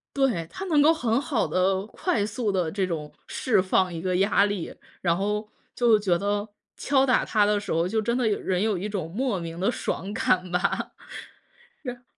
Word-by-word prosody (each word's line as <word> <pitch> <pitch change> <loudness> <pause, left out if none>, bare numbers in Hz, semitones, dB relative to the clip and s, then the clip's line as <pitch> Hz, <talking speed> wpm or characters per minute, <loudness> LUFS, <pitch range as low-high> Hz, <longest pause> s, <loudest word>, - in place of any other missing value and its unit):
对， 250 - +1
它 390 - -6
能 310 -6 +3
够 310 +3 +6
很 245 -5 0
好 280 -5 0
地， 190 +1 +1
快 225 - -1
速 220 0 -2
地 180 -4 0
这 195 -2 0
种 155 -4 -4 0.2
释 220 -7 +1
放 185 -1 +1
一 165 - -5
个 185 0 0
压 200 +1 +4
力。 205 -4 -4 0.3
然 170 -2 +2
后 210 +3 -1 0.3
就 235 -3 +5
觉 185 -4 +2
得 205 +2 -1 0.3
敲 270 -2 +2
打 255 -2 +3
它 210 -2 +2
的 210 0 +2
时 205 - -6
候， 165 +2 +1
就 220 +3 0
真 235 +3 0
的 250 -3 +1
人 190 -3 0
有 215 -3 +1
一 200 +4 -4
种 190 -6 -3
莫 230 -1 -1
名 165 0 -6
的 195 +6 +2
爽 200 -4 -3
感 180 -3 +1
吧。 180 +1 0 0.9
然 250 -1 -6
205 Hz, 210 characters per minute, -26 LUFS, 185-235 Hz, 0.9 s, 够